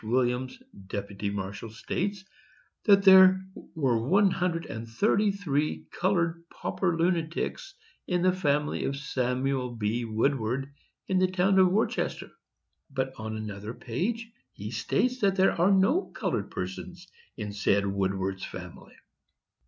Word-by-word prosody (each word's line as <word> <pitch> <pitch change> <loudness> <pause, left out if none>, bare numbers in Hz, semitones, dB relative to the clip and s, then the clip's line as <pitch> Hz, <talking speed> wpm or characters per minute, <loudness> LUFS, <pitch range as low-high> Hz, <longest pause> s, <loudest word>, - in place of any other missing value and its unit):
Williams, 125 +2 0 0.3
deputy 100 +1 -4
marshal, 100 +2 -5
states 190 - -3 0.6
that 200 -2 +6
there 190 -1 +8 0.4
were 130 -7 +1
one 190 - +4
hundred 175 -2 -1
and 110 +1 -7
thirty 205 - +2
three 145 - -1
colored 170 -3 0
pauper 175 -4 -2
lunatics 170 - -1 0.3
in 180 -1 0
the 185 0 +4
family 150 -5 0
of 140 - -2
Samuel 130 -1 -1
B. 115 +2 -1
Woodward, 125 +3 -1 0.3
in 190 -1 +2
the 185 0 +3
town 190 +1 +3
of 185 -1 +6
Worcester; 215 +4 -1 0.6
but 130 -1 -2
on 110 0 -5
another 105 +1 -6
page 225 - -3 0.2
he - - -7
states 255 +1 0
that 195 -3 +2
there 190 0 +4
are 175 +3 +2
no 200 - +3
colored - - -2
persons - - -6 0.3
in 105 -1 -5
said 100 0 +2
Woodward's 95 -1 -1
family. 90 -2 -9
140 Hz, 130 wpm, -28 LUFS, -, 0.6 s, there